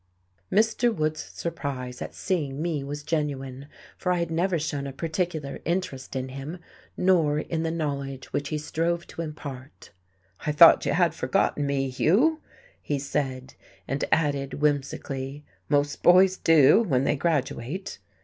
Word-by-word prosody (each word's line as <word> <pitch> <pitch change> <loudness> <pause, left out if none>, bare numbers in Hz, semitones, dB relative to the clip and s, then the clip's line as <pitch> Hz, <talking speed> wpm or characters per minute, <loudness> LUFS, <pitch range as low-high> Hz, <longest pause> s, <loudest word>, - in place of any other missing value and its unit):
Mr. 225 +3 +3
Wood's 155 -6 -1
surprise 135 -7 -5
at - - -6
seeing 145 -7 -2
me 160 -3 -1
was 145 +1 -6
genuine. 140 -3 -3 0.3
For 180 - 0
I 180 - +2
had 170 -1 -2
never 175 +2 +1
shown 145 -3 -3
a - - -5
particular 160 -1 -3
interest 165 -8 -3
in 130 0 -3
him, 135 +6 -6 0.4
nor 165 -6 +3
in 160 +1 -2
the 165 - -1
knowledge 140 -5 -4
which 140 0 -1
he 155 - -1
strove 165 +3 -1
to - - -7
impart. 145 -4 -8 0.5
"I 150 - 0
thought 150 - +8
you - - +2
had - - +3
forgotten 145 -1 0
me, 135 -1 0
Hugh," 250 - +3 0.4
he 145 - -2
said, 135 -2 -3 0.3
and 135 +1 -2
added 140 -3 +1
whimsically: 140 -1 -2 0.2
"most 145 0 +1
boys 185 +1 +6
do, 165 +4 +6
when 135 - +1
they 145 - +2
graduate." 150 +3 -2
150 Hz, 150 wpm, -26 LUFS, 135-170 Hz, 0.5 s, thought